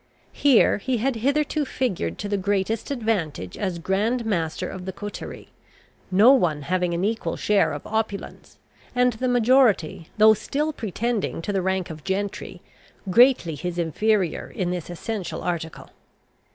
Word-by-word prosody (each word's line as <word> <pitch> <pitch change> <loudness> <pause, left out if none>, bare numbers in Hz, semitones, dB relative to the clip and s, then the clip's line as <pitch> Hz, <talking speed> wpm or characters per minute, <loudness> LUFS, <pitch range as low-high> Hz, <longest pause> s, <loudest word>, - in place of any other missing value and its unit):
Here 270 -7 +4
he 250 +4 -1
had 245 +2 0
hitherto 295 +5 +1
figured 190 - -2
to - - -4
the 205 - -1
greatest 200 +2 -1
advantage 205 - -2
as 185 -4 -2
grand 210 +8 0
master 180 -3 -1
of 185 -1 -7
the 190 - -3
coterie, 205 +2 -8 0.6
no 205 +7 +6
one 165 - +2
having 180 +2 0
an 170 - -2
equal 225 +1 -2
share 210 -1 +2
of - - -6
opulence, 220 -2 -4 0.4
and 250 0 +3
the 255 +4 -2
majority, 240 - +3
though 215 0 +7
still 295 +8 -2
pretending 230 -2 -2
to 205 - -2
the 195 - +1
rank 190 -2 -1
of 155 -2 -10
gentry, 200 +1 -4 0.5
greatly 240 -6 +5
his 175 +3 -5
inferior 180 +2 0
in 180 -2 -2
this 175 -2 -4
essential 190 +2 -5
article. 165 -2 -4
205 Hz, 150 wpm, -24 LUFS, 180-235 Hz, 0.6 s, though